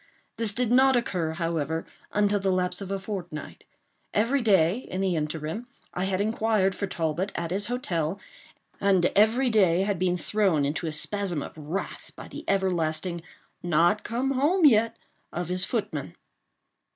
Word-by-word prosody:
This 225 Hz, -2 st, 0 dB
did 240 Hz, +1 st, -1 dB
not 265 Hz, +1 st, +5 dB
occur, 180 Hz, -9 st, 0 dB
however, 160 Hz, -1 st, -2 dB, 0.3 s
until 205 Hz, 0 st, +2 dB
the 195 Hz, 0 st, 0 dB
lapse 180 Hz, 0 st, 0 dB
of 195 Hz, -, -6 dB
a 195 Hz, -, -1 dB
fortnight. 180 Hz, -6 st, -7 dB, 0.5 s
Every 235 Hz, +6 st, +2 dB
day, 195 Hz, -2 st, +3 dB
in 185 Hz, -7 st, -6 dB
the 190 Hz, -2 st, +1 dB
interim, 155 Hz, +8 st, -3 dB, 0.3 s
I 180 Hz, -, -1 dB
had 190 Hz, -1 st, -1 dB
inquired 215 Hz, -2 st, +1 dB
for 200 Hz, -, -3 dB
Talbot 170 Hz, +2 st, -2 dB
at 170 Hz, 0 st, -3 dB
his 200 Hz, +2 st, 0 dB
hotel, 195 Hz, -8 st, -2 dB, 0.6 s
and 190 Hz, -3 st, +3 dB
every 235 Hz, +5 st, +4 dB
day 185 Hz, -5 st, +4 dB
had 200 Hz, -3 st, -1 dB
been 180 Hz, -1 st, +1 dB
thrown 185 Hz, -7 st, +1 dB
into 150 Hz, +4 st, -2 dB
a -, -, -2 dB
spasm 175 Hz, 0 st, -1 dB
of -, -, -9 dB
wrath 155 Hz, +5 st, -5 dB
by -, -, -9 dB
the -, -, -8 dB
everlasting 175 Hz, -3 st, 0 dB, 0.4 s
"Not 175 Hz, +4 st, +2 dB
come 250 Hz, +4 st, -1 dB
home 305 Hz, +7 st, +3 dB
yet" 230 Hz, -3 st, +4 dB, 0.3 s
of 175 Hz, 0 st, -4 dB
his 180 Hz, 0 st, +1 dB
footman. 150 Hz, -, -3 dB
190 Hz, 160 wpm, -26 LUFS, 170-215 Hz, 0.6 s, not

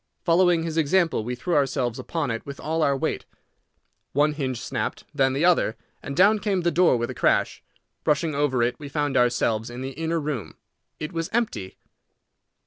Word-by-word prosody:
Following 175 Hz, -1 st, +3 dB
his 165 Hz, -1 st, -3 dB
example, 165 Hz, -4 st, +2 dB
we 125 Hz, +2 st, -3 dB
threw 170 Hz, +8 st, -3 dB
ourselves 130 Hz, -4 st, 0 dB
upon 165 Hz, -7 st, -2 dB
it 115 Hz, -, -4 dB
with 140 Hz, 0 st, -8 dB
all 160 Hz, +1 st, -1 dB
our 140 Hz, -2 st, +2 dB
weight. -, -, -2 dB, 0.9 s
One 150 Hz, +2 st, +3 dB
hinge 130 Hz, -5 st, -3 dB
snapped, 125 Hz, -, -3 dB
then 135 Hz, -2 st, +2 dB
the 145 Hz, +5 st, +1 dB
other, 175 Hz, -10 st, +3 dB, 0.2 s
and 140 Hz, -, -6 dB
down 205 Hz, +4 st, +5 dB
came 195 Hz, -2 st, 0 dB
the 170 Hz, 0 st, +1 dB
door 170 Hz, -5 st, +4 dB
with 120 Hz, 0 st, -2 dB
a -, -, -6 dB
crash. -, -, +1 dB, 0.4 s
Rushing 150 Hz, +1 st, +1 dB
over 140 Hz, -4 st, +1 dB
it, 120 Hz, +1 st, -1 dB
we 145 Hz, -2 st, -8 dB
found 145 Hz, -1 st, -1 dB
ourselves 120 Hz, -2 st, +2 dB
in 120 Hz, +1 st, -7 dB
the 135 Hz, +1 st, -4 dB
inner 165 Hz, +4 st, -2 dB
room. 145 Hz, -7 st, -4 dB, 0.4 s
It 155 Hz, +4 st, -5 dB
was 165 Hz, -1 st, -2 dB
empty. 165 Hz, -, -2 dB
145 Hz, 185 wpm, -25 LUFS, 130-165 Hz, 0.9 s, down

